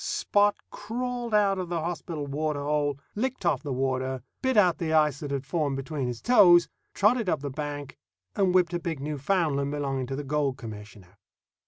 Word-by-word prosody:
Spot 205 0 +2 0.2
crawled 240 +2 -4
out 200 -2 +3
of 180 -2 -4
the 170 -1 -1
hospital 165 -2 -4
water 145 +1 -2
hole, 145 -1 0 0.2
licked 255 -1 -3
off - - +2
the 145 - -5
water, 130 -1 -1 0.2
bit 260 -3 +1
out 180 -5 +4
the 160 -2 -2
ice 150 -3 +3
that 145 - -5
had 140 -1 -3
formed 145 -3 -1
between 135 -1 -3
his 120 -2 -5
toes, 175 -8 +6 0.3
trotted 215 0 +3
up 155 - 0
the 140 -1 -4
bank, 145 -1 -6 0.4
and 195 -2 +2
whipped 180 -1 +3
a 175 - 0
big 165 -4 -4
Newfoundland 145 0 0
belonging 135 -3 -2
to 135 - -3
the 145 - -4
Gold 140 -2 -1
Commissioner. 105 -4 -11
150 Hz, 185 wpm, -27 LUFS, 135-180 Hz, 0.4 s, toes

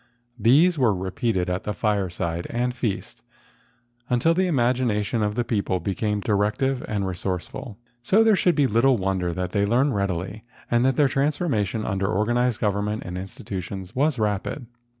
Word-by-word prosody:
These 150 - +4
were 115 -6 +3
repeated 95 +1 -1
at 90 +3 -2
fireside 90 -5 -1
and 125 +1 -1
feast, 115 -5 -4 0.9
until 125 +7 +3
the 185 +2 +1
imagina¬ 120 - +1
tion 115 +1 -1
of 105 0 0
the 120 - +1
people 100 -6 -1
became 105 +3 -1
directive 105 +6 0
and 105 -2 -1
resource¬ 90 -1 -3
ful. 110 -7 -8 0.2
So 200 - +4
there 220 -2 +5
should 180 -2 +2
be 145 - +3
little 125 +2 +3
wonder 95 -3 -1
that 90 +1 -3
they 100 0 +1
learned 130 +5 +2
readily 100 +2 -2 0.3
and 120 0 +3
that 135 -1 +3
their 145 0 +4
transformation 135 - 0
under 95 0 -1
organized 120 +3 +1
government 105 +1 -1
and 90 - -5
institutions 95 0 -6
was 145 +1 +2
rapid. 105 +5 -2
105 Hz, 160 wpm, -24 LUFS, 95-125 Hz, 0.9 s, there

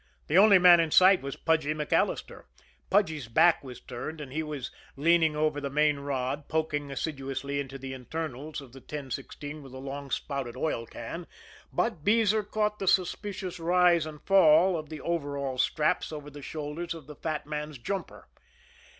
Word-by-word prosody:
The 160 - +2
only 200 -1 +8
man 175 -1 +8
in 165 -1 +2
sight 185 +4 +6
was 135 0 -5
Pudgy 160 -2 +1
MacAllister. 150 -1 -1 0.4
Pudgy's 160 - +1
back 165 +9 +4
was 125 -2 -9
turned, 145 +6 -7
and 135 -3 -8
he 155 - -1
was 150 -4 -5 0.2
leaning 160 +1 +3
over 150 -1 0
the 140 - -3
main 150 0 +2
rod 140 0 -3
poking 150 -2 -1
assiduously 135 -1 -3
into 135 -1 -5
the 135 0 -7
internals 150 +2 -5
of 130 -3 -14
the 135 - -11
1016 145 +2 -7
with 135 -2 -12
a - - -6
long 140 +1 -6
spouted 130 -2 -3
oil 115 -6 -2
can; - - -7 0.4
but 155 - -1
Beezer 215 +1 +3
caught 210 0 -1
the 195 - -3
suspicious 185 0 0
rise 175 -1 +3
and 150 -1 -10
fall 185 -1 +5
of 155 -2 -5
the 155 -2 -7
overall 140 -5 -2
straps 150 +5 +1
over 150 -1 -7
the 145 0 -10
shoulders 155 +4 -5
of 160 -4 -11
the 150 +1 -10
fat 155 +1 -3
man's 150 -1 -5
jumper. 190 +11 -5
150 Hz, 170 wpm, -28 LUFS, 140-170 Hz, 0.4 s, only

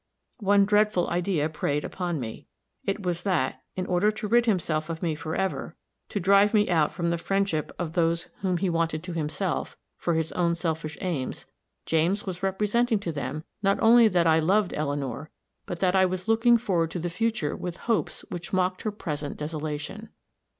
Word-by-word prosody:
One 200 -1 +4
dreadful 210 -3 +3
idea 175 -3 +1
preyed 150 -2 -1
upon 175 -4 -3
me. 115 -3 -7 0.4
It 195 +1 -2
was, 175 -1 -1
that, 155 -9 0
in 185 - -2
order 180 +3 +2
to 215 0 -5
rid 235 +2 +3
himself 165 -6 0
of 165 +1 -4
me 165 -2 +1
for 155 +1 -4
ever, 190 0 -2 0.3
to 205 - -2
drive 200 +3 +5
me 210 0 +4
out 155 -3 +3
from 170 -1 -1
the 170 0 0
friendship 195 -4 0
of 165 -3 -3
those 170 -1 +1
whom 185 -2 0
he 190 +3 0
wanted 165 -2 0
to 180 -1 -5
himself, 165 +3 -2 0.2
for 170 - 0
his 160 0 0
own 170 -1 +1
selfish 160 -2 -3
aims, 160 -8 -3 0.4
James 170 +6 +1
was 180 -2 -5
representing 210 +5 +1
to 195 -4 -3
them 145 0 -4 0.2
not 195 -1 +3
only 230 0 +7
that 180 -4 +2
I 160 0 +5
loved 190 +5 +2
Eleanor, 145 -1 -3 0.4
but 175 - -5
that 185 0 +3
I 190 0 +5
was 185 +1 -4
looking 230 +2 +5
forward 180 -8 0
to 175 - -4
the 175 +1 -3
future 220 -5 -1
with 180 0 -5
hopes 230 -2 0
which 175 -1 -6
mocked 185 -1 +1
her 215 - -2
present 150 -8 -5
desolation. 155 +7 -5
175 Hz, 185 wpm, -26 LUFS, 160-200 Hz, 0.4 s, only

